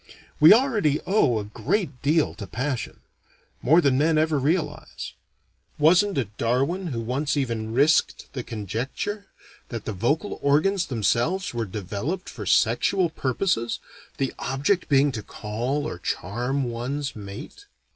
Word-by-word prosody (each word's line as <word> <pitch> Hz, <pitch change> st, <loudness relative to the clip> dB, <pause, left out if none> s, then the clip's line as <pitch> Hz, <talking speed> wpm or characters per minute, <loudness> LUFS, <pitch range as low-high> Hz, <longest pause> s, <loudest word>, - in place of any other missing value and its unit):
We 155 Hz, -, +9 dB
already 215 Hz, -, +4 dB
owe 160 Hz, -, +3 dB
a 105 Hz, -, -2 dB
great 125 Hz, -, -2 dB
deal 155 Hz, +2 st, +2 dB
to 100 Hz, -, -8 dB
passion: 125 Hz, +6 st, -3 dB, 0.6 s
more 160 Hz, +7 st, +5 dB
than 140 Hz, -4 st, +3 dB
men 155 Hz, +1 st, +3 dB
ever 155 Hz, -1 st, +2 dB
realize. 155 Hz, +4 st, -2 dB, 0.6 s
Wasn't 180 Hz, +5 st, +4 dB
it 110 Hz, -6 st, -2 dB
Darwin 135 Hz, +11 st, 0 dB
who 120 Hz, -7 st, -3 dB
once 140 Hz, +6 st, -1 dB
even 115 Hz, -5 st, -2 dB
risked 145 Hz, +7 st, +2 dB
the 130 Hz, -, -3 dB
conjecture 120 Hz, -, -4 dB, 0.4 s
that 115 Hz, -3 st, -5 dB
the 110 Hz, -, -3 dB
vocal 145 Hz, -, -1 dB
organs 170 Hz, +7 st, +2 dB
themselves 125 Hz, -, 0 dB
were 115 Hz, -1 st, -1 dB
developed 105 Hz, -, -4 dB
for -, -, -7 dB
sexual 185 Hz, -4 st, +3 dB
purposes, 130 Hz, -4 st, 0 dB, 0.4 s
the 135 Hz, -, -1 dB
object 140 Hz, +7 st, 0 dB
being 140 Hz, 0 st, +4 dB
to 115 Hz, -4 st, -4 dB
call 120 Hz, +9 st, -3 dB
or -, -, -6 dB
charm 125 Hz, +9 st, -2 dB
one's 130 Hz, +4 st, -3 dB
mate. 105 Hz, -, -9 dB
140 Hz, 135 wpm, -25 LUFS, 115-160 Hz, 0.6 s, We